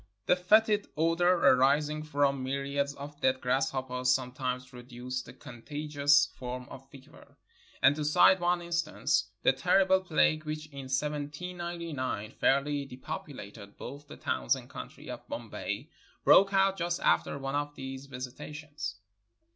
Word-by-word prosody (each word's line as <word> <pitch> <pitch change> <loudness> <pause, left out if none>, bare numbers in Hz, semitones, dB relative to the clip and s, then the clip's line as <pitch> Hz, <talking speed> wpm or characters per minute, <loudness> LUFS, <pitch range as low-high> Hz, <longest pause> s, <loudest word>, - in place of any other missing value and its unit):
The - - +4
fetid 210 +3 +3
odor 165 +3 +3
arising 150 -1 +4
from 140 -3 0
myri 140 +1 -3
ads 140 0 -3
of 145 +1 -9
dead 130 0 +2
grasshoppers 130 0 0
sometimes 125 0 -1
produces 125 0 -7
a - - -10
con 120 -2 -12
tagious 145 0 +2
form 125 0 -6
of 135 0 -11
fever; 135 -2 -16 0.5
and, 135 +2 +6
to 155 - -3
cite 175 +5 +5
one 175 0 +1
instance, 170 0 0
the - - +5
terrible 190 -1 +3
plague 155 -3 +2
which 155 0 -4
in 140 -1 -8
1799 150 - -3
fairly 140 +1 +1
depopulated 125 -7 -8
both 145 +1 -9
the - - -11
towns 65 -1 0
and - - -11
country - - -9
of - - -8
Bombay - - -5 0.3
broke 195 0 +7
out 195 0 +3
just 175 0 -1
after - - +2
one 135 0 -4
of 145 0 -2
their 135 0 -6
visitations. 135 -2 -6
145 Hz, 140 wpm, -30 LUFS, 130-160 Hz, 0.5 s, broke